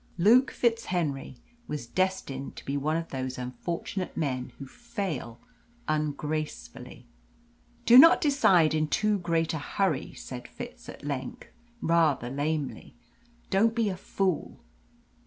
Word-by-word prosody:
Luke 235 +9 +5
FitzHenry 175 - -1 0.3
was 150 -5 -4
destined 145 -3 -2
to - - -11
be 140 - -2
one 150 +3 0
of 165 0 -4
those 130 -1 -4
unfortunate 165 +9 -4
men 130 -5 -2
who 140 - -8
fail 190 - -5 0.5
ungracefully. 155 0 -3 0.8
"Do 245 +2 +9
not 330 +5 +9
decide 195 - +4
in 155 0 +1
too 210 +5 +1
great 165 -2 0
a 160 - -2
hurry," 160 0 -1
said 125 -1 -8
Fitz - - -9
at - - -10
length, 135 -3 -5 0.3
rather 155 -7 +2
lamely. 145 +1 -3 0.6
"Don't 220 +4 +3
be 230 -3 +1
a 190 - -3
fool!" 185 -1 -2
160 Hz, 125 wpm, -28 LUFS, 140-195 Hz, 0.8 s, Do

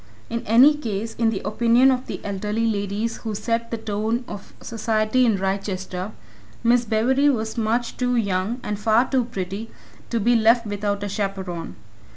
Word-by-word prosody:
In 230 0 -1
any 250 +7 +7
case, 225 -6 -4
in 230 -1 +3
the 210 -3 -3
opinion 235 +4 +4
of 255 0 -2
the - - -5
elderly 210 +3 -2
ladies 210 +1 -1
who 220 -2 -5
set 230 +2 -1
the 230 - -3
tone 220 +3 -2
of 205 -1 -9
society 225 +2 +1
in 215 -3 +2
Wrychester, 190 0 -3 0.5
Miss 240 +1 +3
Bewery 255 +6 +3
was 220 -4 -1
much 230 +1 -1
too 250 0 +1
young, 200 +1 0
and 210 -1 -3
far 225 +4 +3
too 260 -3 +1
pretty, 200 0 -5 0.4
to 235 - 0
be 240 +3 +3
left 230 +1 +4
without 205 -1 -2
a - - -2
chaperon. 195 -4 -4
220 Hz, 170 wpm, -23 LUFS, 200-235 Hz, 0.5 s, any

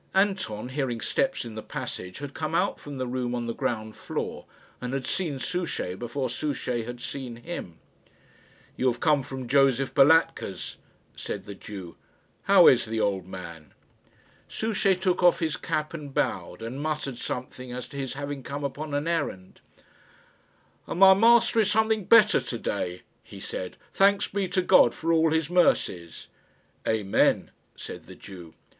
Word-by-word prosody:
Anton, 190 - 0
hearing 130 -4 -2
steps 270 - 0
in 115 - -7
the 110 - -6
passage, 90 -3 -6
had 140 -1 -7
come 155 +1 -3
out 190 +4 +1
from 145 -1 -8
the 130 - -2
room 125 -1 -2
on 120 -1 -2
the 115 - -2
ground 110 -2 -3
floor, - - -5 0.3
and 125 +2 -3
had 135 - -3
seen 160 -7 -1
Souchey 175 - -3
before 120 +6 -3
Souchey 125 -3 -2
had 120 +1 -7
seen 125 -1 -6
him. 120 - -7 1.0
"You 130 - 0
have 120 - -7
come 150 -1 +3
from 130 -2 -7
Josef 135 0 +3
Balatka's," 145 - +3 0.4
said - - -5
the 100 - -7
Jew. 95 -3 -9 0.5
"How - - +7
is - - +6
the 110 0 -3
old 100 -4 0
man?" 85 -5 -9 0.7
Souchey 205 -3 +1
took 185 -1 0
off 175 -1 +6
his 160 -2 -1
cap 155 -3 -2
and 150 -4 -7
bowed, 115 - -2
and 125 +5 -5
muttered 150 -5 -3
something 125 0 -5
as 125 0 -5
to 140 - -9
his 135 -1 -3
having 140 0 -5
come 140 +2 -5
upon 145 +1 -4
an 145 +3 -1
errand. 145 - -3 1.3
"And 170 - -4
my 190 0 +9
master 230 +3 +5
is 210 -2 +3
something 220 -1 +2
better 215 -1 +6
to 120 - -5
day," 90 -5 -3 0.2
he - - -12
said, 90 - -5 0.2
"thanks 200 +1 +4
be 195 -1 -2
to 185 +1 0
God - - +6
for 165 +1 0
all 160 0 +4
His 160 -1 +1
mercies!" 90 - +1 0.6
"Amen," 105 -3 +2 0.2
said - - -9
the - - -11
Jew. 90 -5 -12
135 Hz, 165 wpm, -27 LUFS, 115-165 Hz, 1.3 s, my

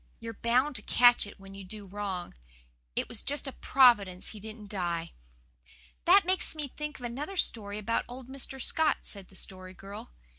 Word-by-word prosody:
"You're 230 0 -6
bound 250 +6 +2
to - - -5
catch 240 -1 +5
it 205 - -12
when 195 0 -12
you 195 0 -8
do 205 +2 -7
wrong. 195 -2 -4 0.6
It - - 0
was 235 - -2
just 290 +1 -1
a - - -3
Providence 210 -10 +4
he 215 - -9
didn't 215 -1 -9
die." 170 -4 -2 0.9
"That 380 +2 +7
makes 370 -2 +1
me 300 -2 -3
think 300 +2 -6
of 245 - -7
another 285 +11 -4
story 205 - -1
about 220 +2 0
old 245 +1 -9
Mr. 265 0 -3
Scott," 315 +4 +2
said 200 -3 -5
the 190 - -18
Story 185 0 -3
Girl. 200 +2 -9
225 Hz, 185 wpm, -30 LUFS, 195-265 Hz, 0.9 s, That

